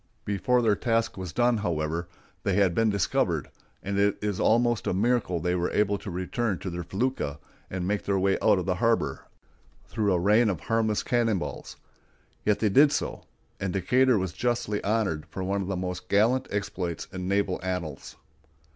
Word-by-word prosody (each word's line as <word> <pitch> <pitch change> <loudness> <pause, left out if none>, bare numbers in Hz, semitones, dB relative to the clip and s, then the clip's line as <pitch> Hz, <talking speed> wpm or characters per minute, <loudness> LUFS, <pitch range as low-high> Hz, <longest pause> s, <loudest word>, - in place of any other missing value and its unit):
Before 120 +5 +1
their 110 -2 +3
task 115 +1 0
was 95 -3 -6
done, 120 +2 +2
however, 85 -3 -2 0.3
they 95 - 0
had 95 -3 +3
been 115 +4 +2
discovered, 100 -4 0 0.3
and 100 +1 -1
it 100 0 +2
is 105 -2 -2
almost 120 0 +2
a - - +1
miracle 110 -4 +1
that 85 - -3
they 90 - +2
were 90 -1 0
able 105 -1 +1
to - - -7
return 95 +4 -2
to 95 - -5
their 85 0 -4
felucca, 95 - -2 0.3
and 90 -1 -3
make 105 0 -1
their 100 -1 +1
way 95 +1 +2
out - - +4
of - - -2
the - - 0
harbor, - - +1 0.6
through 105 -2 0
a 90 - +2
rain 105 +5 +4
of 90 -7 -2
harmless 110 -2 0
cannon 115 -4 +1
balls; 85 - -6 0.7
yet 105 -1 +2
they 105 0 +1
did 140 +8 +6
so, - - -3 0.3
and 95 -2 -2
Decatur 125 +6 +3
was 95 -3 -2
justly 115 0 -1
honored 100 -8 0
for 95 +4 -5
one 100 +1 -1
of 95 - -4
the 95 -2 -2
most 90 0 -5
gallant 115 +6 +3
exploits 90 -4 -3
in 90 -1 -4
naval 100 -1 0
annals. 90 -4 -4
100 Hz, 190 wpm, -27 LUFS, 90-110 Hz, 0.7 s, did